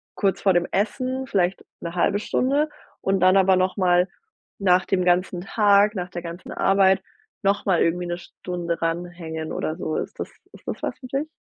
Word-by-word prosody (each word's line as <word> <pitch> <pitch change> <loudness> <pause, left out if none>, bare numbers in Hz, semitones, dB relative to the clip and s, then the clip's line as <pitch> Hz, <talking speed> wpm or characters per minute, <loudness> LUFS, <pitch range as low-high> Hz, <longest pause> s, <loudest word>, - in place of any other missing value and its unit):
kurz 195 -1 0
vor 195 - +4
dem 175 0 +2
Essen, 255 +6 -1
vielleicht 185 -4 0 0.2
'ne 170 0 -5
halbe 185 +3 +2
Stunde 280 +7 +1 0.3
und 195 0 +1
dann 185 +1 +6
aber 190 0 +5
nochmal 185 -1 +2 0.5
nach 185 -2 +3
dem 185 -2 +1
ganzen 180 0 +2
Tag, 205 +1 +3
nach 180 -1 -3
der 175 -1 -6
ganzen 170 +1 -8
Arbeit 195 -1 +3 0.4
nochmal 195 -3 +2
irgendwie 175 +2 0
'ne 175 0 -2
Stunde 175 -1 -5
ran 165 +1 0
hängen 160 -2 -6
oder 155 - -2
so. 160 -3 -3
Ist - - -5
das - - -4 0.2
ist - - -17
das - - -4
was - - -3
für 255 - -9
dich? 275 +4 -2
185 Hz, 185 wpm, -24 LUFS, 175-200 Hz, 0.5 s, dann